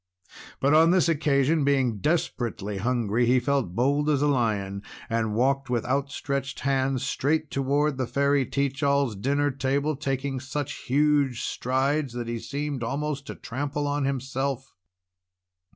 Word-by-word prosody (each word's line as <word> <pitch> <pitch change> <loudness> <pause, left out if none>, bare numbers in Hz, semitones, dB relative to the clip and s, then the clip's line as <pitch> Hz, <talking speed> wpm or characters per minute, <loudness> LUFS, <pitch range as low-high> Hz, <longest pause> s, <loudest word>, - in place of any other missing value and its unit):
But 140 +2 +3
on 160 +2 +6
this 180 -1 +4
occasion, 150 -1 +2
being 135 -6 +1
desperately 120 - -1
hungry, 120 0 +1
he 125 +1 +4
felt 125 -8 -1
bold 140 +5 +2
as 145 -2 +2
a - - +3
lion, 105 -7 0 0.3
and 110 -2 0
walked 135 +3 +1
with 120 -2 0
outstretched 140 +1 -2
hands 135 -1 0
straight 150 +4 0
toward 140 +1 +1
the 130 - 0
Fairy 140 +1 +2
Teach 140 +1 -1
All's 140 -5 +2
dinner 140 +7 +1
table, 140 +3 0
taking 135 -1 -2
such 135 +2 -4
huge 145 -2 +2
strides 135 +2 0
that 120 -1 -4
he 115 0 -3
seemed 145 +1 -4
almost 140 +4 -3
to - - -6
trample 145 +3 -3
on 145 -1 0
himself. 135 0 -2
135 Hz, 145 wpm, -26 LUFS, 125-145 Hz, 0.3 s, on